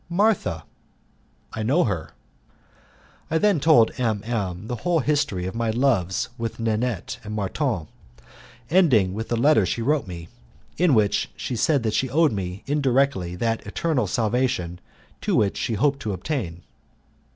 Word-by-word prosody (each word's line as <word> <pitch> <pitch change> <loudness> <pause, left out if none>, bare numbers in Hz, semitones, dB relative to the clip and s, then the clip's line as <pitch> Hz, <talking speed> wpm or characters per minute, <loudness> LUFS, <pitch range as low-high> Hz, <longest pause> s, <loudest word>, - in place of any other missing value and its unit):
"Martha." 175 - +1 0.9
"I 110 - -4
know 135 +11 +3
her." 90 -8 -3 1.2
I 160 - +1
then 200 -1 +3
told 145 -6 +5
M 110 -5 0
M 100 -5 -3
the 120 +2 -4
whole 175 +7 +1
history 140 -11 0
of 95 - -4
my 115 0 -1
loves 110 -7 +1
with 115 0 -4
Nanette 115 -2 -2
and 105 0 -6
Marton, 105 - -1 0.9
ending 130 - +4
with 110 +3 -5
the 120 - +1
letter 130 -2 +4
she 115 +5 -2
wrote 145 -2 +1
me, 85 -2 -8 0.5
in 170 -5 +3
which 105 -2 +2
she 125 - -3
said 140 +3 +2
that 110 -2 0
she 130 - 0
owed 155 +4 +3
me, 95 -1 -4
indirectly, 135 -10 +1
that 115 +4 -1
eternal 125 0 0
salvation 110 -5 -1 0.4
to - - 0
which 100 -2 +2
she 115 - -2
hoped 140 +5 +1
to 105 - -3
attain. 95 - -4
115 Hz, 150 wpm, -24 LUFS, 100-140 Hz, 1.2 s, told